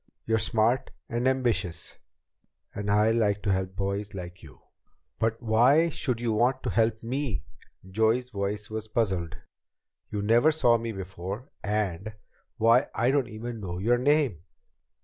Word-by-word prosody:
You're 110 0 +2
smart 110 +3 +1 0.2
and 120 +1 0
ambitious, 120 -10 -1 0.7
and 100 0 -4
I 105 +2 +4
like 105 -3 +1
to 100 - +1
help 95 0 -1
boys 100 +2 -3
like 90 -2 -8
you." 70 -7 -14 0.6
"But 115 0 0
why 125 +9 +4
should 125 -6 -2
you 120 -2 0
want 125 +4 +1
to - - -1
help 115 -1 +1
me?" 125 - -2 0.4
Joey's 110 +6 +1
voice 105 0 -3
was 110 0 -4
puzzled. 95 -7 -1 0.7
"You 105 -1 -3
never 120 +8 +4
saw 120 -7 +3
me 115 0 -4
before. 95 +5 -6
And 105 0 -2 0.4
Why, 115 +4 +4
I 120 +2 +2
don't 140 -2 +1
even 115 +1 -6
know 90 -3 -5
your 120 +6 +2
name." 140 - +2
110 Hz, 150 wpm, -27 LUFS, 100-120 Hz, 0.7 s, I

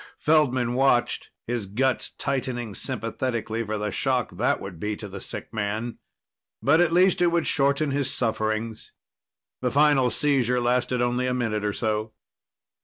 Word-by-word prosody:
Feldman 130 -6 +2
watched, 130 -1 +2 0.2
his 120 -4 -3
guts 130 +6 0
tightening 125 -5 -2
sympathetically 115 +2 -3
for 110 0 -3
the 105 0 -2
shock 130 +4 0
that 115 +7 +1
would 95 -4 -8
be 105 +4 -2
to 105 - -7
the 100 0 -8
sick - - -8
man. 110 +2 -3 0.6
But 145 +9 +4
at 175 -2 +3
least 180 +2 +4
it 175 - +5
would 170 -1 +1
shorten 140 +1 +2
his 135 -2 0
sufferings. 110 -2 -2 0.7
The 125 - +1
final 140 -1 +4
seizure 130 -4 +2
lasted 125 0 +1
only 125 +1 0
a 125 - 0
minute 110 -4 -1
or 105 -1 0
so. 110 0 -2
120 Hz, 155 wpm, -25 LUFS, 110-135 Hz, 0.7 s, it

